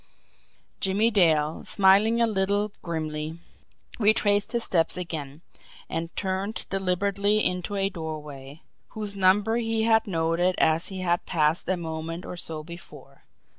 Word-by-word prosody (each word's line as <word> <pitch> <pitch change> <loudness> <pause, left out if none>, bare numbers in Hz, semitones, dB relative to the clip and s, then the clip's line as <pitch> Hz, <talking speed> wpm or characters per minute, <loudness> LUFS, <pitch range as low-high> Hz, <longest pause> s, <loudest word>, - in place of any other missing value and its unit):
Jimmie 205 +4 +2
Dale, 160 -6 +2
smiling 205 +4 +4
a 235 - +4
little 205 0 0
grimly, 155 -1 -4 0.6
retraced 205 -1 +3
his 235 -1 0
steps 165 -1 +2
again, 155 -4 -5 0.5
and 165 0 -3
turned 195 +2 -3
deliberately 200 +2 +1
into 180 +3 -1
a 195 0 +1
doorway 150 -5 -8 0.3
whose 210 -2 -1
number 200 +4 +3
he 225 -1 0
had 225 -1 +3
noted 170 +1 +1
as 160 +1 +2
he 190 -1 -4
had 175 -1 0
passed 160 +1 +1
a 185 - +1
moment 165 +1 -5
or - - -6
so 160 -3 -4
before. 170 +2 -13
185 Hz, 135 wpm, -26 LUFS, 160-205 Hz, 0.6 s, smiling